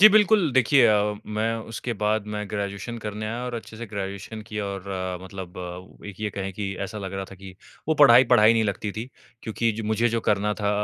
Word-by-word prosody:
जी, 215 - +12
बिल्कुल 210 -5 +4
देखिए 130 0 +5
अ, 105 -1 +3
मैं 110 +2 -1 0.2
उसके 120 +2 -3
बाद 105 0 +1
मैं 105 0 -3
ग्रेजुएशन 100 +3 -4
करने 105 0 -5
आया 120 +3 -3
और 125 -1 -4
अच्छे 115 -1 -7
से 120 +1 -6
ग्रेजुएशन 100 +1 -6
किया 105 -1 -4
और 100 -1 -5 0.4
मतलब 95 -1 -8 0.5
एक 105 -1 -9
ये 105 -1 -1
कहें 95 -1 -4
कि 95 0 -4
ऐसा 100 +2 -4
लग 95 -1 -6
रहा 95 0 -3
था 100 - -9
कि 95 0 -11 0.3
वो 160 - +3
पढ़ाई, 130 -4 +8
पढ़ाई 115 -2 +6
नहीं 115 -1 +2
लगती 100 0 -2
थी, 115 +5 -5 0.3
क्योंकि 115 0 0
ज 110 - -5
मुझे 110 +2 +2
जो 115 0 0
करना 105 -1 +1
था 100 - +1
105 Hz, 215 wpm, -25 LUFS, 100-115 Hz, 0.5 s, जी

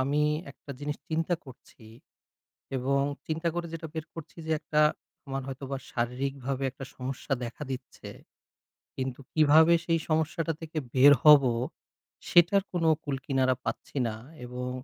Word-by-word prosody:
আমি 140 +3 +1 0.3
একটা 140 - -13
জিনিস 145 0 -3
চিন্তা 165 +2 +1
করছি 125 -3 -15 0.9
এবং 135 +2 +1 0.3
চিন্তা 160 +2 -1
করে 175 0 -2
যেটা 165 0 -5
বের 160 -1 -3
করছি 160 -2 -10
যে 160 - 0
একটা, 150 - +1 0.5
আমার 135 0 -3
হয়তোবা 135 0 -5 0.2
শারীরিকভাবে 135 +2 -2
একটা 135 +1 -9
সমস্যা 130 +2 -4
দেখা 120 +5 -7
দিচ্ছে। 130 -1 -7 0.9
কিন্তু 130 -1 -3
কিভাবে 155 +2 +6
সেই 165 -1 +2
সমস্যাটা 160 +1 0
থেকে 160 0 -7 0.2
বের 140 +2 +8
হবো? 140 -4 +8 0.8
সেটার 180 +3 +5
কোন 175 -2 0 0.2
কূলকিনারা 135 -2 0
পাচ্ছি 115 +5 -4
না 110 - -3 0.3
এবং 125 +1 -5
140 Hz, 135 wpm, -28 LUFS, 130-160 Hz, 0.9 s, বের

